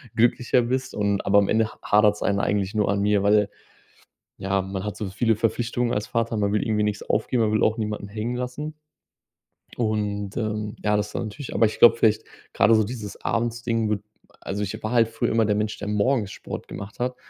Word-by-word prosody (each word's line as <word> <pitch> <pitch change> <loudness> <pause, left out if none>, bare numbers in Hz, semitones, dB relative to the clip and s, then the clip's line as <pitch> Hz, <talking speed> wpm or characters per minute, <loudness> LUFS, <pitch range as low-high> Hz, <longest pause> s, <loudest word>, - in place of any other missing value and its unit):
glücklicher 120 +1 +3
bist.“ 130 +2 -2
Und 100 -1 0
aber 100 +1 +5
am 100 - +1
Ende 110 0 +3
ha - - -21
hadert's 105 0 +3
ein 100 -1 +1
eigentlich 100 -1 0
nur 105 -2 +1
an 100 0 +1
mir, 105 -1 +2
weil 105 0 +3 0.9
ja, 95 0 0
man 95 +1 -5
hat 105 - -4
so 105 - -4
viele 110 +3 +1
Verpflichtungen 120 +2 0
als 105 +1 -2
Vater. 115 -1 -1
Man 100 -1 +1
will 105 - +1
irgendwie 105 -2 +1
nix 105 -1 -1
aufgeben, 115 +2 0
aber 105 - +2
man 110 - +2
will - - +4
auch 110 +2 -2
niemanden 105 -2 -3
hängen 110 +4 -4
lassen. 145 +5 -5 1.0
Und, 105 -3 -2
ähm, 105 -2 -2
ja, 105 0 +2
das 105 0 -1
ist - - -13
dann - - -1
natürlich 115 +6 -7
aber 115 - +4
ich 110 - -2
glaube 115 0 +8
vielleicht 110 -1 +3 0.3
grade 115 - +5
so 110 - +4
dieses 110 -2 -7
Abends-Ding 115 -1 -1
wird 105 -1 -1 0.4
also, 100 +2 -4
ich 110 +3 -5
war 110 - -2
halt 115 -2 +4
früher 115 0 -2
immer 115 -1 +3
der 105 - +1
Mensch, 105 0 -1
der 105 - -5
morgens 105 0 +1
Sport - - -7
gemacht 100 +4 -9
hat, 125 +1 -1
105 Hz, 220 wpm, -24 LUFS, 105-115 Hz, 1.0 s, glaube